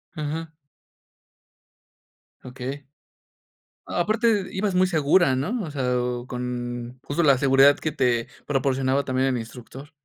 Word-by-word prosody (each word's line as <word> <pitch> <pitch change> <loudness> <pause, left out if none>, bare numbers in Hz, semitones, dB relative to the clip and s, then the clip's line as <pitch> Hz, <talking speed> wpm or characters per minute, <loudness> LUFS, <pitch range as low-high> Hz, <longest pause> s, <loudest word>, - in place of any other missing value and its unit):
Ajá. 155 +1 -4 1.9
Okey. 130 +2 -6 1.0
Aparte 215 +2 +1
ibas 195 0 -1
muy 185 +1 +4
segura, 160 -3 +3
¿no? 210 - -2
O 160 - -6
sea, 125 -3 0
o 125 0 -3
con 125 0 -5
justo 145 +4 -1
la 140 -3 +5
seguridad 135 +2 +5
que 155 - -2
te 120 -5 +1 0.2
proporcionaba 135 0 +1
también 130 +1 0
el 130 - 0
instructor. 125 +5 -10
135 Hz, 120 wpm, -24 LUFS, 125-160 Hz, 1.9 s, la